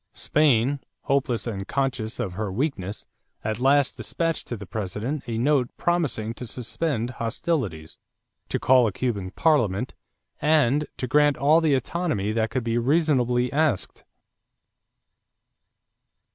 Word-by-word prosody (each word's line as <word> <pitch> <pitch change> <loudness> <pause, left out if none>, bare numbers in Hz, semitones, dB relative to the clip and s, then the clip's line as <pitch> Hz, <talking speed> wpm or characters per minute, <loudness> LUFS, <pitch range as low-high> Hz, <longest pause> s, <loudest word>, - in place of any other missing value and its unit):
Spain, 140 -2 +2 0.2
hopeless 135 -5 0
and 100 -4 -4
conscious 130 -5 -2
of 100 -7 -2
her 105 +1 -3
weakness, 105 - -3 0.4
at 110 0 -2
last 140 +1 +3
dispatched 165 -1 -2
to 120 - -4
the 100 - -8
President 105 +8 -3
a 115 -1 -2
note 130 0 +2
promising 145 -11 0
to 125 +1 -7
suspend 125 +1 -2
hostilities, 115 - -3 0.5
to - - 0
call 130 -2 +5
a - - -1
Cuban 100 -4 -2
parliament, 120 - +1 0.5
and 150 -1 +3
to - - -2
grant 145 +3 +3
all 155 +4 +4
the 155 -4 +3
autonomy 130 - -1
that 110 0 0
could 125 +1 -2
be 115 0 0
reasonably 125 -3 +2
asked. 150 -8 0
125 Hz, 130 wpm, -25 LUFS, 110-145 Hz, 0.5 s, call